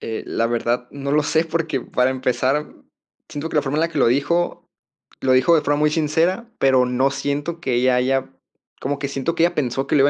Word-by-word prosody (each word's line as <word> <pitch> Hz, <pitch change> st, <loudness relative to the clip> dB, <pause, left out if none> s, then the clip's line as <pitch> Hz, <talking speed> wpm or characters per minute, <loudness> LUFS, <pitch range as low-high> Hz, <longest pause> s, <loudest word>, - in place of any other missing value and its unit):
Eh, 110 Hz, -, -5 dB
la 115 Hz, -, 0 dB
verdad 120 Hz, +1 st, -1 dB
no 140 Hz, 0 st, -5 dB
lo 150 Hz, -, +3 dB
sé, 160 Hz, +2 st, +1 dB
porque 160 Hz, -4 st, -2 dB
para 125 Hz, +2 st, 0 dB
empezar, 130 Hz, +2 st, 0 dB
mm, -, -, -21 dB, 0.4 s
siento 145 Hz, +2 st, -5 dB
que 160 Hz, -, -4 dB
la 150 Hz, -, +3 dB
forma 140 Hz, +1 st, -2 dB
en 155 Hz, -, +2 dB
la 165 Hz, -, +1 dB
que 160 Hz, -3 st, -4 dB
lo -, -, +4 dB
dijo. 145 Hz, +8 st, 0 dB, 0.6 s
Lo 130 Hz, -, +2 dB
dijo 130 Hz, +6 st, +4 dB
de 155 Hz, -, +3 dB
forma 145 Hz, 0 st, +1 dB
muy 150 Hz, 0 st, +3 dB
sincera, 165 Hz, +8 st, 0 dB
pero 130 Hz, -2 st, +4 dB
no 125 Hz, +2 st, +1 dB
siento 145 Hz, +4 st, -3 dB
que 130 Hz, -5 st, -1 dB
ella 125 Hz, +1 st, +3 dB
haya 130 Hz, +1 st, 0 dB, 0.5 s
como 140 Hz, +1 st, -2 dB
que 140 Hz, -, -3 dB
siento 140 Hz, +4 st, -2 dB
que 165 Hz, -, +2 dB
ella 175 Hz, -, +1 dB
pensó 135 Hz, -1 st, -1 dB
que -, -, +1 dB
lo -, -, +4 dB
iba 140 Hz, -, +5 dB
140 Hz, 240 wpm, -21 LUFS, 130-155 Hz, 0.6 s, iba